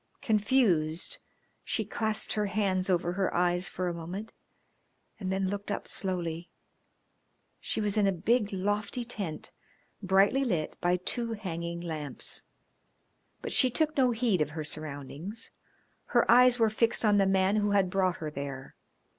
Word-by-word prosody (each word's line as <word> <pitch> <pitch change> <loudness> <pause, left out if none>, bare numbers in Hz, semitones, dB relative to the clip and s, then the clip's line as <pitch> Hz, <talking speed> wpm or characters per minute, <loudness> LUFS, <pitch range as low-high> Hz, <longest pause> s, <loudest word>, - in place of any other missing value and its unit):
Confused, 200 -8 +2 0.4
she - - -1
clasped 220 -1 0
her 210 -1 0
hands 195 -2 0
over 175 -1 +1
her 190 0 0
eyes 175 +1 +2
for 185 0 -3
a 175 - -1
moment 180 +6 -7 0.9
and 190 -3 -3
then 190 0 0
looked 205 +2 -4
up 205 - -3
slowly. 175 -3 -3 1.1
She - - -3
was 210 0 -1
in 205 -2 +4
a - - +3
big, 210 +4 +1
lofty 205 +5 -1
tent, 200 -9 -5 0.5
brightly 195 +7 +3
lit 175 - -1
by 175 +1 +2
two 230 +5 -2
hanging 170 -5 -5
lamps. 155 -5 -4 1.0
But - - -3
she 260 - +6
took 305 +4 0
no 260 -2 +4
heed 225 -7 +1
of 150 - +1
her 155 - -2
surroundings; 150 +6 -6 0.5
her - - +2
eyes 250 0 +6
were 225 -2 +3
fixed 230 +1 +1
on 205 -1 +4
the 195 - +3
man 190 +1 +2
who 205 -1 +1
had 195 -3 +2
brought 185 -2 +1
her 155 -3 -5
there. 140 -2 -6
195 Hz, 155 wpm, -29 LUFS, 170-215 Hz, 1.1 s, she